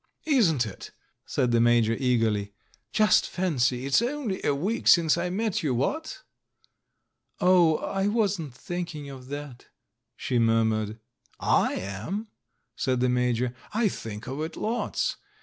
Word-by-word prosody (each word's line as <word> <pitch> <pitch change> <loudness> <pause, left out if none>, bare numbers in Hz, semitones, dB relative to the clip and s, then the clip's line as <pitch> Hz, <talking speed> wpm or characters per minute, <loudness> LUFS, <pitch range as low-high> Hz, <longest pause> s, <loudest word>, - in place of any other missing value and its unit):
"Isn't 185 - +3
it?" 100 - -8 0.4
said 125 -2 0
the 115 -1 +3
Major 120 -1 +4
eagerly. 115 -5 0 0.4
"Just 215 -1 +3
fancy, 130 -8 0
it's 140 +9 +3
only 245 -5 -2
a 145 - +2
week 200 +11 -2
since 165 -3 +6
I 175 +1 -2
met 210 +2 -1
you, 140 -6 0
what?" 310 - -2 1.2
"Oh, 175 -3 +5
I 195 0 -1
wasn't 200 - 0
thinking 165 -3 -5
of 130 -2 -11
that," 145 -3 -8 0.5
she 125 -2 -1
murmured. 110 -1 +1 0.4
"J - - +2
am," 110 - -5 0.5
said 130 -1 0
the 125 0 +2
Major, 125 0 +1 0.2
"I 220 -2 +3
think 110 - -7
of 135 +4 -5
it 160 +1 -5
lots. 230 +3 -1
140 Hz, 135 wpm, -26 LUFS, 120-185 Hz, 1.2 s, since